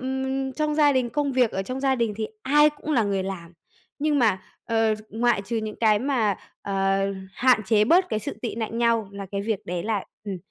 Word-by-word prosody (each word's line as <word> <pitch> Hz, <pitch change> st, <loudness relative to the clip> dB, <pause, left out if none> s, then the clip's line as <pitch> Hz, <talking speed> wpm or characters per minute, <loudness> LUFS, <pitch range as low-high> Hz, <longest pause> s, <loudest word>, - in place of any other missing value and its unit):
ừm, 265 Hz, +1 st, -2 dB
trong 305 Hz, 0 st, -1 dB
gia 295 Hz, -2 st, +5 dB
đình, 250 Hz, -3 st, 0 dB
công 290 Hz, -2 st, -1 dB
việc 250 Hz, -3 st, +3 dB
ở 195 Hz, -, -2 dB
trong 255 Hz, +6 st, -5 dB
gia 270 Hz, -1 st, +2 dB
đình 230 Hz, -4 st, -1 dB
thì 220 Hz, -1 st, -2 dB, 0.2 s
ai 295 Hz, +2 st, +5 dB
cũng 295 Hz, +1 st, -5 dB
là 235 Hz, -5 st, +3 dB
người 200 Hz, -2 st, 0 dB
làm, 180 Hz, -3 st, -6 dB, 0.5 s
nhưng 295 Hz, 0 st, +1 dB
mà, 210 Hz, -6 st, +2 dB, 0.2 s
ờ, 225 Hz, -1 st, +2 dB
ngoại 230 Hz, -2 st, +1 dB
trừ 230 Hz, +3 st, -3 dB
những 215 Hz, -1 st, -4 dB
cái 215 Hz, -2 st, +4 dB
mà, 230 Hz, -6 st, +1 dB, 0.3 s
ờ, 195 Hz, 0 st, +1 dB, 0.3 s
hạn 250 Hz, -3 st, +4 dB
chế 215 Hz, -2 st, +4 dB
bớt 360 Hz, -, +4 dB
cái 215 Hz, -, -1 dB
sự 210 Hz, -, -5 dB
tị 235 Hz, -, -3 dB
nạnh 230 Hz, 0 st, -3 dB
nhau 230 Hz, -3 st, +2 dB
là 200 Hz, -1 st, -7 dB
cái 200 Hz, -, -1 dB
việc 215 Hz, -1 st, -3 dB
đấy 175 Hz, -1 st, -3 dB
là, 215 Hz, -3 st, -1 dB, 0.2 s
ừm, 200 Hz, -2 st, -4 dB
230 Hz, 225 wpm, -25 LUFS, 205-265 Hz, 0.5 s, gia